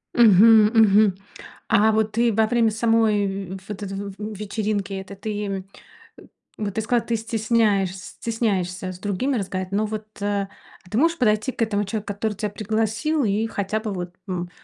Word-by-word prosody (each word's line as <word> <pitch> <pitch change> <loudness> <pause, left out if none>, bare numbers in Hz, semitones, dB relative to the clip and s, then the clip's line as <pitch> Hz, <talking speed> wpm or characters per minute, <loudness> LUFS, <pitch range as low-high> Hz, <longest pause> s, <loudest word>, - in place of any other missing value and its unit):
Мгм, 220 0 +7
мгм, 210 -3 +5 0.5
а 220 +2 +4
вот 220 0 +1
ты 235 +1 +2
во 220 +1 +3
время 230 0 +2
самой 215 -3 +1
вь 190 - -9
вот 205 -1 -6
этой 195 0 -5
в 200 -1 -6 0.2
вечеринки 205 -1 -2
этой, 190 +1 -6
ты 215 - -6
им, 195 -2 -3 0.5
э, - - -14 0.4
вот 205 -3 -3
ты 220 - 0
сказала, 235 +2 +1
ты 235 - +1
стесняешь 220 -4 +1
стесняешься 190 -3 -3
с 180 - -10
другими 215 +7 -1
разговаривать? 185 -1 -4
Но 210 +2 +1
вот, 215 0 -5 0.2
а, 200 -1 -1 0.4
а - - -17
ты 215 - -2
можешь 335 +2 +3
подойти 215 -1 +2
к - - -7
этому 205 -2 0
человеку, 205 0 -4
который 210 +1 -2
тя 210 +1 -3
пригласил, 220 +8 -1
и 215 +1 +1
хотя 205 0 -2
бы 215 -1 -4
вот, 180 -1 -5
м, 180 -1 -3
210 Hz, 180 wpm, -23 LUFS, 195-225 Hz, 0.5 s, Мгм